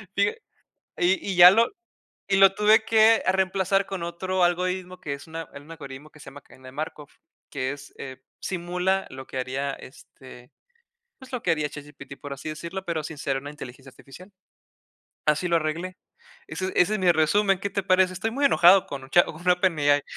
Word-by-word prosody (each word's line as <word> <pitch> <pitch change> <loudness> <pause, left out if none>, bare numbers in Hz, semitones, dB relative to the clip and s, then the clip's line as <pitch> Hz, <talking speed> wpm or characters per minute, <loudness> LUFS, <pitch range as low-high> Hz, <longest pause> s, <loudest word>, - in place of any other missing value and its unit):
Fíja 200 +1 +2 0.6
y 180 +2 +2
y - - -4
ya 175 0 +10
lo 230 +4 +3 0.6
y 195 - +3
lo 195 0 +6
tuve 215 +1 +4
que, 225 0 +5
ah, - - +3
reemplazar 190 +1 +1
con 190 -3 -6
otro 180 +2 -2
algoritmo, 180 +1 -1
que 140 - -4
es 140 +4 -10
un 160 - -13
a 165 -1 -6
un 145 +3 -12
algoritmo 145 -1 -10
que 150 - -18
se - - -13
llama, 145 - -12
Cadena 130 0 -17
de - - -14
Markov, 150 0 -7 0.4
que 130 -1 -2
es, 145 - -13
eh, 130 -1 -9 0.2
simula 180 +1 -2
lo 130 0 -10
que 130 - -7
haría, 135 +2 -3
este, 130 -1 -14 0.7
pues, 260 0 -14
lo 245 - -4
que 170 - +2
haría 150 -2 0
ChatGPT, 145 -1 -11
por 145 - -8
así 140 +3 -9
decirlo, 170 +5 -6
pero 165 -2 -3
sin 155 0 -8
ser 135 -1 -2
una 140 +2 -7
inteligencia 135 -2 -11
artificial. 160 +9 -15 1.0
Así 150 +4 +1
lo 170 - +3
arreglé. 170 +4 -3 0.5
Ese 175 +4 -4
ese 180 +4 +3
es - - -1
mi 180 -1 +4
resumen, 195 +5 +2
¿qué 200 - -3
te 200 - -2
parece? 185 -1 +3
Estoy 185 +5 -3
muy 280 +4 -2
enojado 190 -7 +6
con 135 -1 -8
Chat 175 - +5
con 175 +3 -6
OpenAI 155 -6 +3
170 Hz, 195 wpm, -25 LUFS, 145-190 Hz, 1.0 s, ya